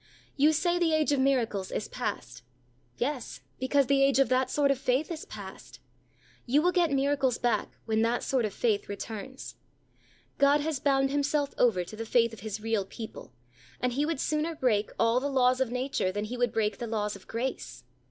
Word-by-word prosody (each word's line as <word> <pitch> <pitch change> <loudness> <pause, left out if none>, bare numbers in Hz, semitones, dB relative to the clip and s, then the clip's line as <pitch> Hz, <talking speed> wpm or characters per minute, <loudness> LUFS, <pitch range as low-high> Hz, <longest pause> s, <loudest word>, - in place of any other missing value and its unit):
You 290 +2 +5
say 345 +3 +1
the 330 -2 +2
age 305 -1 +2
of 285 - +2
miracles 235 -8 +1
is - - -3
past. 125 - -5 0.6
Yes, 260 -1 -3 0.2
because 270 +2 +2
the 275 +1 +3
age 275 0 +4
of 270 - +4
that 255 0 +2
sort 280 0 +2
of 275 - -1
faith 265 +6 0
is 325 -1 -5
past. - - -10 0.7
You 285 +5 +3
will 360 - +4
get 350 -2 +2
miracles 275 -2 +1
back 240 -1 -1
when 220 -1 +1
that 235 +2 +1
sort 260 -3 +1
of 215 - -1
faith 210 0 0
returns. 220 +5 -7 0.8
God 280 +1 +5
has 305 -2 -2
bound 270 -1 +2
Himself 285 0 0
over 215 -8 +3
to 175 - -10
the 225 +1 -6
faith 230 -1 +3
of 225 - -10
His 215 0 -5
real 220 -2 0
people, 220 - -9 0.5
and 250 -1 0
He 290 +4 0
would 325 -4 -2
sooner 310 +3 -1
break 220 -7 +1
all 230 +2 +3
the 285 +2 -2
laws 255 -1 +3
of 260 - +1
nature, 250 -6 -1
than 205 +2 -3
He 235 +4 -5
would 245 -2 +1
break 215 -3 -1
the 235 - -4
laws 210 -2 -2
of 195 - -14
grace. 245 +4 -4
255 Hz, 200 wpm, -28 LUFS, 225-280 Hz, 0.8 s, You